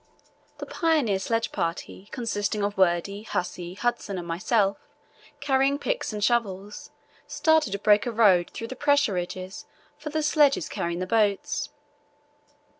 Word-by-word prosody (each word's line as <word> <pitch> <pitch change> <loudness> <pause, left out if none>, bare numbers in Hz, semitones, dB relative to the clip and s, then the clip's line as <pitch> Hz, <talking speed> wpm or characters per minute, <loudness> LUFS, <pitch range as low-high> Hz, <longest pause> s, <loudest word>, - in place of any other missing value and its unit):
The - - -6
pioneer 300 - +1
sledge 230 +3 -1
party, 170 +3 -4
consisting 210 -4 -2
of 205 0 -1
Wordie, 190 +2 +1
Hussey, 175 0 -4
Hudson, 235 -3 -2
and 175 -1 -6
myself, 195 +4 +1 0.6
carrying 270 0 +2
picks - - -2
and 210 -1 -4
shovels, 205 -4 -1 0.4
started 315 -8 +2
to - - -1
break 210 +2 +3
a - - -1
road 200 -6 +4
through 230 - -7
the 260 - -6
pressure 285 -5 +2
ridges 185 +1 -5 0.3
for 300 - -6
the 310 0 -1
sledges 295 - +3
carrying 170 0 -3
the - - -1
boats. 205 -1 0
210 Hz, 140 wpm, -26 LUFS, 190-260 Hz, 0.6 s, road